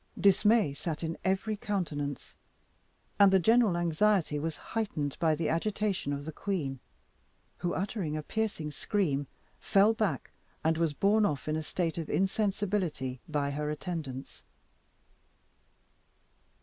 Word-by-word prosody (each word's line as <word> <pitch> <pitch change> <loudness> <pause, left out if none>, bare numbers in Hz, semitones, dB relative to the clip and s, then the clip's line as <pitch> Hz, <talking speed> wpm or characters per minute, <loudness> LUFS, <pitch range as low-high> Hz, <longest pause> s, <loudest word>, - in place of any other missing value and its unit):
Dismay 200 -3 +4
sat 155 +2 -4
in 165 0 -2
every 195 +3 0
countenance, 155 -9 -3 0.8
and 200 -1 +8
the 190 - +6
general 220 -1 +4
anxiety 175 -1 +2
was 160 +1 -3 0.2
heightened 155 -11 -1
by 160 -2 +3
the 160 0 -1
agitation 195 -1 0
of 140 0 -3
the 160 - -4
queen, 155 -7 -3 0.8
who, 175 - -1
uttering 185 -5 -2
a 155 - -4
piercing 205 -7 -2
scream, 145 -6 0 0.3
fell 200 +3 +4
back, 200 - -1 0.3
and 160 +1 +3
was 165 -2 +1
borne 210 +6 +3
off 145 - 0
in 155 - 0
a 160 - -1
state 165 +1 -2
of 160 - -5
insensibility 190 - 0
by 145 -2 0
her 150 +1 -2
attendants. 150 -4 -5
170 Hz, 130 wpm, -30 LUFS, 150-200 Hz, 0.8 s, and